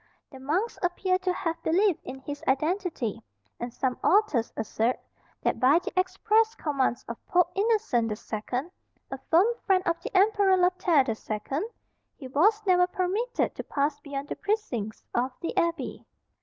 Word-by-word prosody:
The 265 Hz, -, -11 dB
monks 340 Hz, -, -1 dB
appear 370 Hz, +1 st, +1 dB
to 370 Hz, 0 st, 0 dB
have 335 Hz, -2 st, -3 dB
believed 370 Hz, +2 st, +2 dB
in 265 Hz, 0 st, -8 dB
his 290 Hz, +1 st, -7 dB
identity, 295 Hz, -, 0 dB, 0.4 s
and 240 Hz, 0 st, -4 dB
some 250 Hz, +1 st, -2 dB
authors 385 Hz, -, +3 dB
assert 225 Hz, +2 st, 0 dB, 0.4 s
that -, -, 0 dB
by 260 Hz, +6 st, +5 dB
the 355 Hz, -, -3 dB
express 425 Hz, +5 st, +2 dB
commands 275 Hz, -, -1 dB
of 235 Hz, -, -7 dB
Pope 355 Hz, -1 st, +3 dB
Innocent 400 Hz, -, +1 dB
the 210 Hz, -, -2 dB
Second, 245 Hz, +9 st, -4 dB, 0.4 s
a 270 Hz, -, -4 dB
firm 340 Hz, +4 st, +6 dB, 0.2 s
friend 375 Hz, -2 st, +4 dB
of 335 Hz, 0 st, 0 dB
the -, -, -5 dB
Emperor 400 Hz, -1 st, +4 dB
Lothaire 355 Hz, -5 st, +3 dB
the 230 Hz, -, 0 dB
Second, 220 Hz, -, -3 dB, 0.5 s
he 270 Hz, -, -9 dB
was 415 Hz, -, +3 dB
never 360 Hz, -2 st, +4 dB
permitted 380 Hz, +7 st, -1 dB
to -, -, -6 dB
pass 285 Hz, 0 st, -1 dB
beyond 280 Hz, -1 st, -6 dB
the -, -, -3 dB
precincts 260 Hz, -, -3 dB
of 250 Hz, +2 st, 0 dB
the 335 Hz, -, -4 dB
abbey. 335 Hz, -6 st, -1 dB
335 Hz, 160 wpm, -27 LUFS, 260-375 Hz, 0.5 s, firm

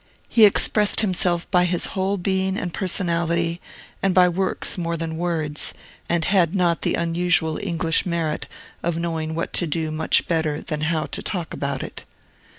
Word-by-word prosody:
He 225 Hz, -2 st, +6 dB
expressed 210 Hz, +1 st, +4 dB
himself 180 Hz, -4 st, 0 dB
by 180 Hz, -2 st, +4 dB
his 175 Hz, -1 st, +1 dB
whole 195 Hz, +1 st, 0 dB
being 190 Hz, +1 st, 0 dB
and 180 Hz, -6 st, -3 dB
personality, 170 Hz, -2 st, -1 dB, 0.4 s
and 195 Hz, -2 st, +1 dB
by 180 Hz, -1 st, +7 dB
works 185 Hz, +2 st, 0 dB
more 170 Hz, -2 st, -2 dB
than 165 Hz, 0 st, -4 dB
words, 160 Hz, -3 st, -1 dB, 0.3 s
and 170 Hz, -2 st, +1 dB
had 180 Hz, -4 st, +3 dB
the -, -, 0 dB
not 170 Hz, -2 st, +1 dB
unusual 170 Hz, -1 st, +1 dB
English 165 Hz, -3 st, 0 dB
merit 170 Hz, -3 st, -2 dB, 0.3 s
of 170 Hz, -1 st, -1 dB
knowing 160 Hz, -2 st, -2 dB
what 165 Hz, -, -3 dB
to 175 Hz, -, 0 dB
do 160 Hz, 0 st, -2 dB
much 155 Hz, +1 st, +2 dB
better 160 Hz, -3 st, 0 dB
than 150 Hz, -2 st, -4 dB
how 155 Hz, 0 st, 0 dB
to -, -, -5 dB
talk 175 Hz, -5 st, -4 dB
about 140 Hz, -1 st, -3 dB
it. -, -, -8 dB
170 Hz, 165 wpm, -22 LUFS, 160-185 Hz, 0.4 s, by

